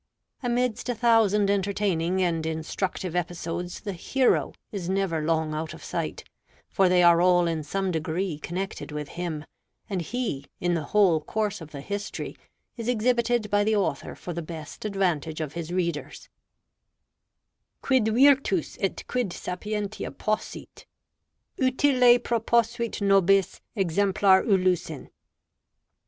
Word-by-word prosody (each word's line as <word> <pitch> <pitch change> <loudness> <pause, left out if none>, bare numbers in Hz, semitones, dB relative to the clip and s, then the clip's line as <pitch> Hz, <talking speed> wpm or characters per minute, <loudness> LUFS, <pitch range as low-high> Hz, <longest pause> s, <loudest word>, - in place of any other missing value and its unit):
Amidst 245 -1 -1
a 245 - 0
thousand 215 -3 +3
entertaining 190 -3 0
and 165 -2 0
instructive 160 +3 -3
episodes 175 0 -3
the 200 -3 -4
Hero 255 +9 +1 0.2
is 185 -4 -4
never 190 -4 0
long 160 -1 0
out 155 +1 -4
of - - -13
sight; - - -4 0.4
for 190 -2 +2
they 180 0 +4
are 170 0 +6
all 175 -1 +4
in 165 -2 -1
some 190 +5 -2
degree 160 0 -2
connected 180 0 -5
with 150 -1 -5
him; 165 -4 -4 0.4
and 190 -3 -2
He, 170 - -3
in 175 0 +1
the 160 -3 -1
whole 185 -6 +3
course 210 +4 -2
of 160 - -9
the 145 -2 -8
History, 205 +6 -5 0.4
is 230 -1 -5
exhibited 240 -2 +1
by 205 0 +3
the 215 +1 +2
author 200 -2 -1
for 175 - -7
the 170 - -3
best 160 +3 -8
advantage 175 -6 -1
of 150 -2 -4
his 170 -1 -5
readers: 170 -6 -3 1.5
"Quid 260 -5 +3
Virtus 255 - +3
et 195 - -1
quid 245 -7 -1
sapientia 210 +4 -4
possit, 215 0 -4 0.7
Utile 255 -2 +4
proposuit 235 -1 0
nobis 195 -1 +3
exemplar 195 +1 +3
Ulyssen." 180 - 0
190 Hz, 130 wpm, -26 LUFS, 170-215 Hz, 1.5 s, are